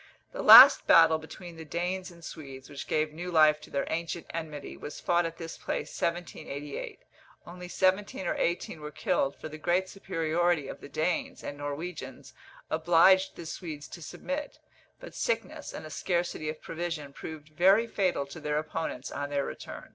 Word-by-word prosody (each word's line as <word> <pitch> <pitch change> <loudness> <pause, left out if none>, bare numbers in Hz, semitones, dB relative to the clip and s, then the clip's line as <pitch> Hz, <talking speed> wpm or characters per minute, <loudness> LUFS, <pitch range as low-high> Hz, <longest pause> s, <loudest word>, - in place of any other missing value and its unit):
The - - -5
last - - +10
battle 160 -1 +7
between 165 +2 -10
the 160 - -7
Danes 180 +4 -3
and 170 -2 -14
Swedes, 135 -3 -9
which 140 - -7
gave 155 0 0
new 175 +3 -6
life 155 -2 +5
to - - -13
their 140 - -1
ancient 165 +1 -3
enmity, 155 -3 -6
was 150 - -8
fought 175 -1 +2
at 165 0 -9
this 165 -1 -7
place - - -4
1788; 150 -4 -4 0.4
only 180 +1 -9
seventeen 190 +1 0
or - - +1
eighteen 170 -2 -2
were 150 - -6
killed, 140 -2 0
for - - -8
the 155 0 -9
great 175 +4 +1
superiority 170 -4 0
of - - -8
the - - -10
Danes 165 +4 -2
and 145 - -5
Norwegians 145 +4 -6 0.4
obliged 175 +4 +4
the 170 - -8
Swedes 155 -3 -6
to 170 - -10
submit; 280 - -5 0.4
but - - -10
sickness, - - -2
and - - -8
a - - -9
scarcity 175 -3 -1
of 155 - -7
provision, 165 -4 -5
proved 155 0 -9
very 190 +8 +4
fatal 185 -10 0
to 140 +3 -10
their 150 -1 -1
opponents 155 -3 -4
on 145 0 -4
their 140 -1 -1
return. - - -8
165 Hz, 175 wpm, -29 LUFS, 150-175 Hz, 0.4 s, last